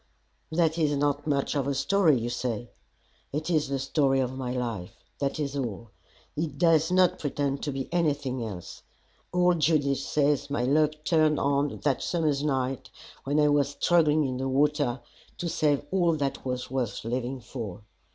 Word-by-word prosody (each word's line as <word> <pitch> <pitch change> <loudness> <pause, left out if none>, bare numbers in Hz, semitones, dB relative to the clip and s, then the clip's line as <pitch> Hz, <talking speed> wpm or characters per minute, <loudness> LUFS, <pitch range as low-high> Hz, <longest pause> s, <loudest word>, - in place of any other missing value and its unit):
That 165 0 +1
is 145 -3 +2
not 145 +1 0
much 140 -2 0
of 140 -2 0
a 140 - 0
story, 160 +1 +3
you 115 +1 -3
say. 120 -1 -3 0.6
It 155 +4 -2
is 155 -4 +2
the 140 0 -1
story 135 0 +1
of 130 0 -1
my 130 -2 -3
life. 115 -8 -4 0.2
That 140 +1 -1
is 140 -2 -2
all. 115 -5 -4 0.4
It 150 -2 -3
does 165 -1 +3
not 185 -1 +3
pretend 140 -1 -2
to 145 - -2
be 135 -1 -4
anything 145 -7 0
else. 95 -6 -7 0.5
Old 180 -1 +3
Judith 145 -3 +2
says 145 0 +1
my 140 -3 -1
luck 150 +4 +3
turned 155 -2 +3
on 140 0 0
that 140 -3 +1
summer's 155 -5 0
night 135 -3 -1 0.4
when 145 +2 +1
I 150 0 +4
was 145 -1 +1
struggling 155 -3 +3
in 130 -1 -2
the 135 +1 -2
water 140 -2 +1 0.4
to 175 - -3
save 150 -3 +1
all 175 -3 +3
that 140 -3 -2
was 125 -1 -4
worth 130 -4 -2
living 125 +2 -2
for. 110 -5 -7
140 Hz, 170 wpm, -27 LUFS, 130-155 Hz, 0.6 s, I